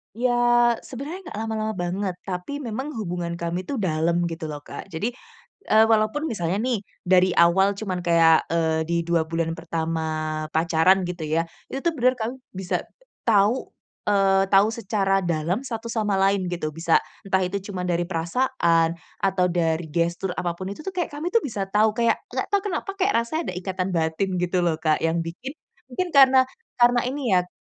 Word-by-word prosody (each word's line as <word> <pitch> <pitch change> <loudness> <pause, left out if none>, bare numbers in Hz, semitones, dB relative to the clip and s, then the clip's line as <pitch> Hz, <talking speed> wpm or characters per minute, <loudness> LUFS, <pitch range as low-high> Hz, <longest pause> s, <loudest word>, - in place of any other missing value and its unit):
Ya, 245 +2 +1 0.6
sebenarnya 280 +8 -6
gak - - -6
lama-lama 220 -1 -2
banget, 185 +1 -2
tapi 195 +11 -5
memang 265 +6 -4
hubungan 175 -5 -3
kami 170 +2 -4
itu 280 - -2
dalam 170 -4 +1
gitu 165 -1 -5
loh 145 -1 -7
Kak, - - -8
jadi, 195 +6 -3 0.6
eee, 220 +1 +6
walaupun 220 +7 +2
misalnya 175 -3 -1
nih 250 -3 0 0.2
dari 185 0 +4
awal 190 +4 +4
cuman 195 -3 -3
kayak, 165 -1 +5
eee, 160 -1 +1
di 170 - 0
2 165 -1 +1
bulan 165 0 -1
pertama 165 -1 -2 0.5
pacaran 170 +3 +3
gitu 175 -2 -4
ya, 160 +2 +1 0.2
itu 270 - -4
tuh 340 - +2
bener 255 0 +4
kamu 240 +1 -3 0.2
bisa 185 -1 -1 0.5
tahu, 215 +3 +3 0.4
eee, 195 -1 +3
tahu 195 +1 +6
secara 195 -3 0
dalam 170 +1 -1
satu 230 -1 -5
sama 210 -3 0
lain 195 -1 +2
gitu, 170 -3 -3
bisa 165 +2 +2 0.3
entah 190 -1 +2
itu 185 +2 -2
cuma 185 -2 -4
dari 175 -1 0
perasaan, 170 -2 +1 0.3
atau 190 -2 +2
dari 165 -1 0
gestur 170 +3 -1
apa 175 -1 -2
pun 190 +1 -5
itu 200 - -8
tuh 385 - -3
kayak 350 -2 -2
kami 305 +4 -4
tuh 460 - +5
bisa 205 -8 -3
tau, 215 +1 +4
kayak 235 -1 +3 0.2
gak - - -2
tau 405 -1 +3
kenapa 390 0 -3
kayak 390 +1 +2
rasanya 315 - -3
ada 180 - -9
ikatan 185 0 -3
batin 160 +4 0
gitu 180 0 0
loh 165 -2 +2
Kak 155 -1 +2
yang 165 +1 +1
bikin 190 +11 -6 0.4
mungkin 350 +8 -3
karena 265 -1 +7 0.3
karena 240 0 +5
ini 280 +3 -3
ya 180 -1 +3
190 Hz, 180 wpm, -24 LUFS, 170-225 Hz, 0.6 s, karena